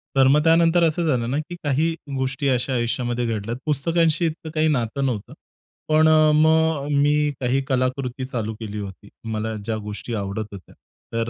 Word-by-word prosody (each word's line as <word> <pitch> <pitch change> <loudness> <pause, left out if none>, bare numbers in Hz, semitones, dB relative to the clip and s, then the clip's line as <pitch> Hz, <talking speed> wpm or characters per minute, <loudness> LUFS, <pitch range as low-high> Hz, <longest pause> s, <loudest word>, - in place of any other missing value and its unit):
तर 135 -1 +5
मग 150 +3 +4
त्यानंतर 165 +1 +4
असं 165 +1 +1
झालं 120 -5 0
ना, 140 - 0
की 155 +3 -6
काही 150 +3 +1 0.2
गोष्टी 135 +2 -1
अशा 130 +1 0
आयुष्यामध्ये 120 0 -1
घडल्यात. 115 +1 -3
पुस्तकांशी 160 +2 +1
इतकं 160 0 -4
काही 155 0 +3
नातं 135 -2 0
नव्हतं. 115 -6 -3 0.6
पण 155 +1 +5 0.3
मग 160 -1 +3
मी 150 0 +2
काही 130 +1 +1
कलाकृती 130 0 -1
चालू 115 -4 -3
केली 105 -2 -5
होती. 100 0 -9 0.2
मला 110 +1 -2
ज्या 110 +2 -2
गोष्टी 105 +3 -6
आवडत 100 +1 -3
होत्या. 100 -4 -12 0.4
तर 115 0 -1
130 Hz, 165 wpm, -22 LUFS, 115-155 Hz, 0.6 s, तर